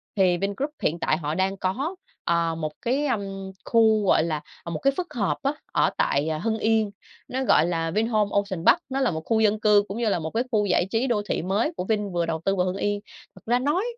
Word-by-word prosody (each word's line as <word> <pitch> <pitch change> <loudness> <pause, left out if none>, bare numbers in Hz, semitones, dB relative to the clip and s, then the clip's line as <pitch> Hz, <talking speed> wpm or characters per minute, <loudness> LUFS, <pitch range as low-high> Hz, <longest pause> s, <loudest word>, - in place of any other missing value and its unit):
Thì 185 -3 +3
Vingroup 200 - -2
hiện 170 +3 0
tại 155 - +1
họ 150 -1 -3
đang 195 +1 0
có, 265 - -2 0.3
ờ, 170 -1 +1
một 155 -2 -3
cái, 275 +5 0
ưm, 195 -4 -3
khu, 220 -2 +4
gọi 160 - +4
là, 155 -3 -2 0.2
à, - - -6
một 160 -2 -3
cái 275 0 +2
phức 355 -1 -4
hợp 210 -5 0
á, 275 - +2 0.2
ở - - +3
tại, 145 +2 +1
à, 155 - -1
Hưng 220 +4 -1
Yên. 220 -2 +2 0.4
Nó 260 +1 -2
gọi 165 - +4
là 165 -2 -1
Vinhomes 215 +1 +1
Ocean 195 -4 -1
Park, - - +6
nó 270 0 -1
là 265 -5 +2
một 160 -1 -4
khu 225 -1 +2
dân 215 -1 +3
cư 210 -2 +5
cũng 200 - -5
như 235 -2 +1
là 185 - +1
một 160 0 -4
cái 235 +2 0
khu 210 -2 +2
giải 180 -1 +2
trí 235 +4 +1
đô 220 -4 +1
thị - - 0
mới 200 - 0
của - - -1
Vin 210 -2 -1
vừa 175 -1 0
đầu 160 -1 -3
tư 195 - +2
vào 180 -1 +1
Hưng 185 +1 -2
Yên. 205 0 0 0.4
Thật - - -15
ra 240 +2 +2
nói 295 +9 +1
205 Hz, 255 wpm, -25 LUFS, 175-230 Hz, 0.4 s, Park